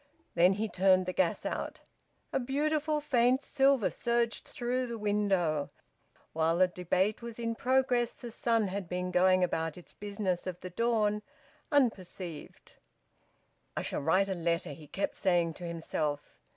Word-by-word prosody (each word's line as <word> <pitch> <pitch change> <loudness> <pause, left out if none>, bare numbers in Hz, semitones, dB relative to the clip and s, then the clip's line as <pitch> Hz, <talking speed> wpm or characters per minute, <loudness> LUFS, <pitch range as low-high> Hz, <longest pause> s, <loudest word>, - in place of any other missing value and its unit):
Then 180 +3 +5
he 215 +3 -1
turned 185 -2 +3
the 185 - -3
gas 180 -3 0
out. - - -3 0.5
A - - +2
beautiful 300 +3 0
faint 255 -1 +3
silver 270 -6 +3
surged 235 -2 0
through 250 +1 -2
the 235 -1 -5
window. 195 -8 +1 0.6
While 165 +1 +2
the 185 +1 +5
debate 185 +4 0
was 235 -1 -7
in 230 -1 -2
progress, 255 -1 +1
the 240 -2 -8
sun 225 -3 +1
had 190 -2 -4
been 180 0 -2
going 185 0 +4
about 165 -2 -1
its 175 - -12
business 200 -3 -3
of 180 -1 -4
the 185 - -7
dawn, 215 0 +1 0.5
unperceived. 185 - -1 1.1
"I - - -1
shall - - -2
write 185 +7 +3
a 195 - -1
letter!" 170 -1 -1
he 155 -2 -12
kept 195 - -2
saying 175 -3 +1
to 175 - -8
himself. 160 -3 -3
195 Hz, 150 wpm, -31 LUFS, 180-235 Hz, 1.1 s, Then